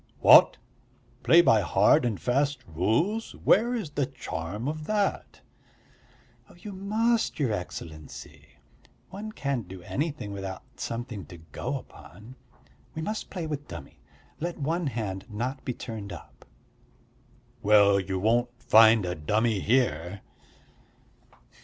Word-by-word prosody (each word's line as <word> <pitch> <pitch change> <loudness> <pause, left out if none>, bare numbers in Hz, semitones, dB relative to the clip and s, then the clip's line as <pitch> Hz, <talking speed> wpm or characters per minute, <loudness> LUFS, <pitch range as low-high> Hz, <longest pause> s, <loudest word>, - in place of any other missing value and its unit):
"What, - - +7 0.6
play 170 +1 +6
by 110 -9 +5
hard 100 +5 +4
and 110 -5 -1
fast 135 +1 0
rules? 115 - 0
Where 235 +4 +3
is 200 -11 -4
the 145 -2 -1
charm 105 -3 -5
of 155 0 -4
that?" 205 -2 -1 1.2
"You 205 +4 -9
must, 220 +4 0
your 135 -6 +1
Excellency. 80 -5 -8 0.6
One 210 +3 -6
can't 140 - -3
do 90 -1 -10
anything 145 - -3
without 95 -1 -6
something 115 - -5
to 85 - -11
go 80 0 -5
upon. 105 - -14 0.6
We 160 - -4
must 215 +4 -4
play 180 -4 -5
with 150 -2 -5
dummy, 85 -2 -10 0.4
let 170 +2 -3
one 160 +3 -1
hand 105 -6 -4
not 125 +5 -4
be 125 - -3
turned 105 -3 -7
up." 85 - -12 1.2
"Well, 100 -2 +5
you 95 0 -3
won't 115 +5 +2
find 110 -2 +6
a 90 - -2
dummy 105 +7 0
here." 100 - 0
120 Hz, 125 wpm, -27 LUFS, 100-155 Hz, 1.2 s, What